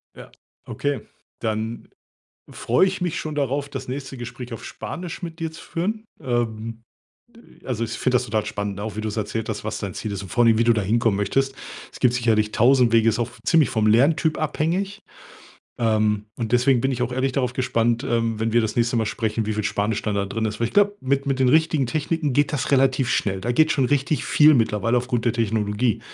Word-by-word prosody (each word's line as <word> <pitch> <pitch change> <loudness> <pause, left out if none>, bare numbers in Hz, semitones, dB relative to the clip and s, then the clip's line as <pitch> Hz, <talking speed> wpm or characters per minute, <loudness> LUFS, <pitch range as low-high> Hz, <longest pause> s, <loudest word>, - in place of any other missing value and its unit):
Ja? - - -10
Ja, - - -18 0.3
okay, 145 -1 -2 0.4
dann 110 +1 -3 0.6
freue 125 +11 +2
ich 185 0 -3
mich 175 -3 -1
schon 155 -1 -5
darauf, 140 0 -1
das 130 -1 -6
nächste 135 0 -6
Gespräch 120 0 -7
auf 115 - -8
Spanisch 180 +1 -7
mit 165 -2 -7
dir 165 -1 -3
zu 160 - -12
führen. 215 +6 -3 0.2
Ähm, 115 -2 -2 0.8
also 115 -3 -2
ich 115 - -4
finde 130 +1 0
das 125 - +2
total 110 -1 -1
spannend, 105 -2 -3
ne? 100 - -6
Auch 110 -2 -5
wie 110 - -3
du's 110 0 -4
erzählt 110 +1 -3
hast, 105 -1 -4
was 110 - -4
dein 100 -3 -5
Ziel 105 - -4
ist 100 0 -4
und 95 - -9
vor 120 - +1
allen 120 - +5
Dingen, 115 0 +4
wie - - +4
du 120 - +5
da 110 - 0
hinkommen 110 +1 +1
möchtest. 135 +7 0 0.4
Es - - -12
gibt 125 -2 +3
sicherlich 110 -3 +1
1.000 125 +1 +4
Wege, 115 0 +5
ist 110 - -1
auch 120 0 -1
ziemlich 160 -4 +4
vom 110 -3 +1
Lerntyp 150 +7 +3
abhängig, 175 +7 -1 0.8
ähm, 105 -2 +1
und 115 -3 -3
deswegen 125 +1 +3
bin 135 - +1
ich 125 -2 -2
auch 125 0 -2
ehrlich 130 +1 0
darauf 125 -2 0
gespannt, 120 -2 0
ähm, 115 -2 0
wenn 110 0 0
wir 120 - +4
das 110 -1 -2
nächste 120 0 +1
Mal 110 -2 +1
sprechen, 110 0 -2
wie 110 - -1
viel 105 - -1
Spanisch 105 +2 -1
da 105 - -1
dann 100 -1 -1
drin 110 +2 -2
ist. 110 - -3
Weil 115 - +1
ich - - -14
glaube, 205 0 +4
mit 140 +1 0
mit 135 -1 0
den 130 -1 +3
richtigen 155 -2 +3
Techniken 155 +2 -1
geht 145 +2 +2
das 145 0 -1
relativ 130 -1 +3
schnell. 95 -2 0
Da 120 +6 -1
geht 155 +5 +4
schon 135 - +2
richtig 145 +2 0
viel 155 0 +6
mittlerweile 115 -1 +1
aufgrund 120 -1 -2
der 120 - +2
Technologie. 110 0 0
120 Hz, 225 wpm, -23 LUFS, 110-140 Hz, 0.8 s, viel